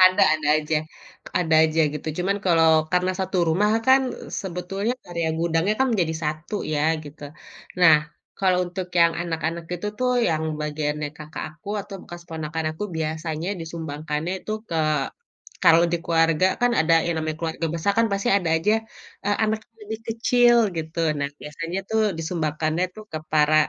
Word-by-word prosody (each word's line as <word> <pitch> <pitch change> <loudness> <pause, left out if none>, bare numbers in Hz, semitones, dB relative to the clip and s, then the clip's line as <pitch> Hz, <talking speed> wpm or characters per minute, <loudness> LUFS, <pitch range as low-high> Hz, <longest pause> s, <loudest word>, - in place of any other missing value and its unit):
Ada 185 0 +6
ada 155 -2 -2
aja 155 0 0 0.6
ada 160 -3 +1
aja 160 0 +2
gitu 150 0 -7
cuma 185 +2 +1
kalau 165 -2 +5 0.2
karena 180 +1 +2
satu 190 0 -1
rumah 205 +6 +3 0.2
kan 265 +1 +6 0.4
sebetulnya 195 +4 -2 0.2
area 170 -2 -1
gudangnya 170 +4 +1
kan 265 - +3
menjadi 170 -7 +1
satu 155 +6 -3 0.2
ya 145 - 0 0.2
gitu. 145 +1 -12 0.6
Nah, 165 -3 +8 0.4
kalau 185 -2 +3
untuk 180 +1 -5
yang 170 0 +6
anak-anak 165 0 -3
itu 180 +4 -5
tuh 255 0 +1 0.2
yang 160 -1 0 0.2
bagiannya 150 0 -2
kakak 155 0 -7
aku 155 +6 -14
atau 200 0 -9
bekas 175 0 -10
ponakan 160 0 -4
aku 160 - -5
biasanya 160 +1 -3
disumbangkannya 160 0 -4 0.2
tuh 215 0 -1
ke 165 - -2 0.9
kalau 165 +1 +7
di 170 - +2
keluarga 165 0 +3 0.2
kan 245 - +4
ada 165 +1 +3
yang 170 -1 0
namanya 155 -1 -2
keluarga 165 0 -2
besar 170 +5 +1
kan 230 - +4
pasti 200 0 -1
ada 175 -4 -2
aja, 200 +6 +1 0.5
eee, 205 0 +2
anak 220 0 +1
yang 225 - -46
lebih 220 +1 -5
kecil 240 +1 +4 0.2
gitu. 160 +1 -4 0.2
Nah, 140 0 -1
biasanya 165 +5 -5
tuh 220 0 +2 0.2
disumbangkannya 160 0 -1
tuh 215 - -9
ke 155 - -2
para, 155 0 +4
165 Hz, 165 wpm, -24 LUFS, 155-185 Hz, 0.9 s, Nah